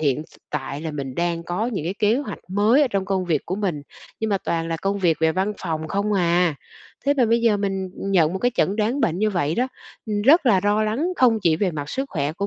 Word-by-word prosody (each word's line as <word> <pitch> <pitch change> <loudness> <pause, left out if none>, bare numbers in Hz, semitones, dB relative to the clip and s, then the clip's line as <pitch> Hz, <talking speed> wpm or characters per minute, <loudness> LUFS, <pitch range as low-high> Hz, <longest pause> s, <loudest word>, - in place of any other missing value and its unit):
hiện 145 -1 +1
s - - -21
tại 140 0 -4
là 160 -1 -4
mình 135 -3 -5
đang 170 -1 -1
có 180 +7 -2
những 200 -10 -3
cái 185 - -2
kế 215 +2 +2
hoạch 265 -8 -4
mới 215 +9 +4
ở 270 - +2
trong 195 -3 -1
công 190 -2 -1
việc 160 -5 -1
của 185 - -2
mình, 180 -9 -2 0.4
nhưng 220 -1 -1
mà 195 - +2
toàn 165 -2 -2
là 165 - -1
công 195 +4 -2
việc 170 -4 +2
về 160 0 +3
văn 195 +4 0
phòng 160 -3 -3
không 200 +3 -1
à. 175 -3 +2 0.5
Thế 285 - +4
mà 260 -4 +3
bây 230 +1 +2
giờ 225 -3 +3
mình 195 -2 -2
nhận 180 -5 +2
một 190 - -2
cái 245 - +1
chẩn 200 - +1
đoán 225 +6 0
bệnh 175 -7 +1
như 215 0 +2
vậy 165 -4 0
đó, 255 +2 0 0.6
rất 290 +1 +6
là 195 -6 +5
lo 210 +1 +2
lắng 235 +11 0
không 235 -4 +4
chỉ 160 -3 +3
về 190 0 0
mặt 145 -2 -5
sức 270 - -2
khỏe 145 0 -1
của 200 +4 -3
190 Hz, 260 wpm, -22 LUFS, 165-215 Hz, 0.6 s, rất